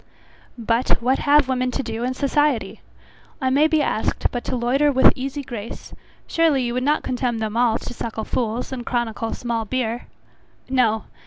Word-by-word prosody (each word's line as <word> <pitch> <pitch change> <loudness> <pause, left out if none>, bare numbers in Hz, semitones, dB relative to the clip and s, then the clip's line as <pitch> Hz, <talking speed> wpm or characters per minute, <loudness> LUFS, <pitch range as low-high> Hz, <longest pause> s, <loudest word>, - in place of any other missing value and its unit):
But 230 +2 +1
what 255 +3 +1
have 290 -1 +4
women 255 -1 0
to 270 +2 -2
do 225 0 -4
in 255 +1 -1
society? 285 -2 0 0.6
I 260 -3 0
may 290 +4 +4
be 315 -2 +2
asked, 220 - -1
but 245 - -3
to 255 - -2
loiter 260 +5 +2
with 260 -1 +6
easy 275 +2 -4
grace; 230 -4 -8 0.3
surely 315 -5 +2
you 240 -1 -2
would 250 - -1
not 295 +4 +1
condemn 245 -2 -1
them 220 -1 -3
all 235 -1 +3
to 245 - -7
suckle 225 -2 -4
fools, 235 +1 -2
and 255 -2 -4
chronicle 230 -2 -2
small 235 -2 -2
beer! 240 +1 -2 0.6
No. 230 -5 +2
250 Hz, 175 wpm, -22 LUFS, 230-270 Hz, 0.6 s, with